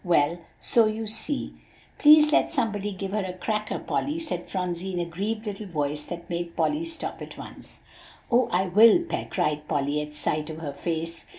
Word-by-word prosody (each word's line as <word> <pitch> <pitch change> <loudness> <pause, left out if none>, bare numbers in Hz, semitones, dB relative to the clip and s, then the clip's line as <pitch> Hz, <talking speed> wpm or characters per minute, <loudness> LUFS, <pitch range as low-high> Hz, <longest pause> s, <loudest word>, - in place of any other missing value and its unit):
"Well, 170 -2 +2 0.2
so 230 -2 +4
you 220 +1 -2
see" 270 +7 -2 0.5
"Please 300 0 +8
let - - +4
somebody 210 -8 -1
give 195 0 -5
her 210 0 0
a 185 -1 -4
cracker, 215 +1 -2
Polly," 295 +3 -2
said 310 - -4
Phronsie 180 0 -3
in 175 - -1
a 175 - 0
grieved 205 +6 -3
little 205 0 -5
voice 150 -3 -2
that 175 -1 -7
made 170 -1 -4
Polly 305 +2 +1
stop 330 -1 -4
at - - -8
once. - - -11 0.5
"Oh! 245 +2 +4
I 185 +2 +2
will, 220 - +6
Pet," 340 - -4
cried 150 -5 -1
Polly 145 +1 0
at 150 0 -7
sight 150 +1 -1
of 160 - -6
her 150 -3 -5
face. 165 +2 -4
185 Hz, 190 wpm, -26 LUFS, 165-225 Hz, 0.5 s, Please